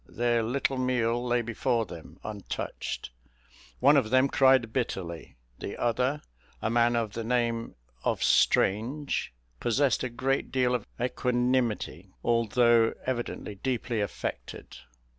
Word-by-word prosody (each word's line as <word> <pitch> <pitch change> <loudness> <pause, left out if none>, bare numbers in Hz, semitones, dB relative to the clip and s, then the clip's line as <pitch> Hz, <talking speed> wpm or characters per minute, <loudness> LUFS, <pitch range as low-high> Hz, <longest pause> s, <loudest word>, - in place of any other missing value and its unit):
Their 120 0 +1
little 130 +3 -1
meal 120 -2 +1
lay 120 -1 +1
before 115 0 0
them 80 -1 -11
untouched; 105 - -5 0.7
one 140 +4 +6
of 130 -6 +3
them 130 +3 +4
cried 130 -5 +4
bitterly; 90 -10 -3 0.2
the - - -5
other, 125 +5 0 0.4
a 110 - -1
man 120 0 +3
of 115 -3 -1
the 115 - -4
name 115 -1 -1 0.3
of - - 0
Strange, 125 +9 +2 0.3
possessed 130 +2 +2
a 125 - -1
great 130 +3 -1
deal 125 -1 +2
of 120 -4 -2
equanimity, 125 -7 0
although 115 0 +3
evidently 120 -4 -3
deeply 120 +1 -2
affected. 100 -4 -5
120 Hz, 120 wpm, -28 LUFS, 115-130 Hz, 0.7 s, one